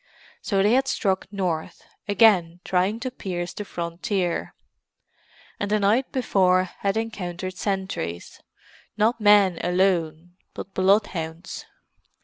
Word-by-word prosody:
So 195 -3 +1
they 210 - +4
had 265 +1 +3
struck 190 -4 -1
north, 180 -6 -3 0.2
again 190 -5 +4
trying 190 +4 +1
to 255 0 -3
pierce 175 -7 -5
the 210 - -5
frontier; 175 0 -3 1.0
and 200 - -2
the 215 0 +2
night 215 +6 +2
before 185 -7 +2
had 195 +2 -3
encountered 185 -5 -4
sentries—not 195 - -4
men 205 -4 +5
alone, 175 -2 0 0.2
but 195 - -8
bloodhounds. 185 -4 0
190 Hz, 110 wpm, -24 LUFS, 175-210 Hz, 1.0 s, men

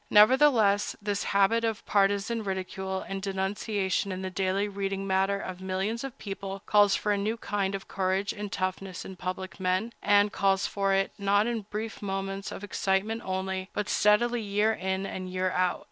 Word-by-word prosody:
Nevertheless, 215 -2 +5
this 205 -1 -2
habit 200 +4 +3
of 225 -2 -2
partizan 205 +3 +1
ridicule 190 0 -3
and 195 0 -4
denunciation 195 0 -1
in 185 0 -4
the 185 - -3
daily 190 +2 0
reading 195 -1 -3
matter 195 +1 +1
of 185 -1 -6
millions 190 +5 -2
of 270 -1 -6
people 195 -1 -6
calls 205 -1 +5
for 210 - 0
a 205 - +1
new 215 +3 -1
kind 200 -3 -1
of 195 - -7
courage 190 +2 0
and 210 -2 -6
toughness 185 -1 -3
in 190 - -8
public 185 +2 -5
men, 185 +5 0
and 205 0 +4
calls 195 -1 +2
for 195 -1 0
it, 195 0 +1
not 200 +1 +3
in 225 -4 -3
brief 220 +1 -5
moments 195 0 -3
of - - -7
excitement 205 +3 0
only, 190 0 -3
but 210 - -2
steadily, 235 +3 +3
year 210 +1 +1
in 190 -1 -2
and 185 -1 -5
year 185 0 0
out. 180 -1 +1
195 Hz, 175 wpm, -28 LUFS, 190-210 Hz, -, Nevertheless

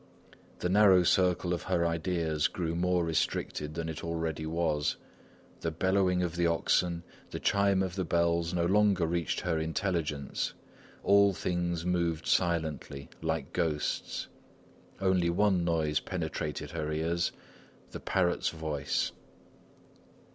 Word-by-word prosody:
The - - -1
narrow 95 -1 +6
circle 90 0 +2
of 85 - -2
her 85 -2 0
ideas 85 -2 0
grew 85 -2 -3
more 90 0 +1
restricted 75 -1 -1
than 85 -1 -3
it 80 -2 -5
already 80 -2 -2
was; 80 -3 0 0.6
the 80 - -1
bellowing 90 +2 +1
of 85 -1 -2
the 85 0 +2
oxen, 85 +1 +1 0.3
the - - -5
chime 100 -1 +2
of 95 -2 -3
the 95 0 -1
bells 85 0 +1
no 85 -1 0
longer 100 -1 +3
reached 85 0 -1
her 85 -3 0
intelligence. 80 -3 -2 0.5
All 100 0 +5
things 85 -2 -2
moved 85 -3 0
silently, 80 -5 -1
like 80 -3 -2
ghosts. 80 -4 -1 0.7
Only 95 -3 +2
one 95 0 +2
noise 80 -3 +1
penetrated 75 -1 -4
her 80 -2 -3
ears: 85 +2 0 0.6
the - - -6
parrot's 90 -2 +1
voice. 75 -3 -2
85 Hz, 125 wpm, -30 LUFS, 80-90 Hz, 0.7 s, narrow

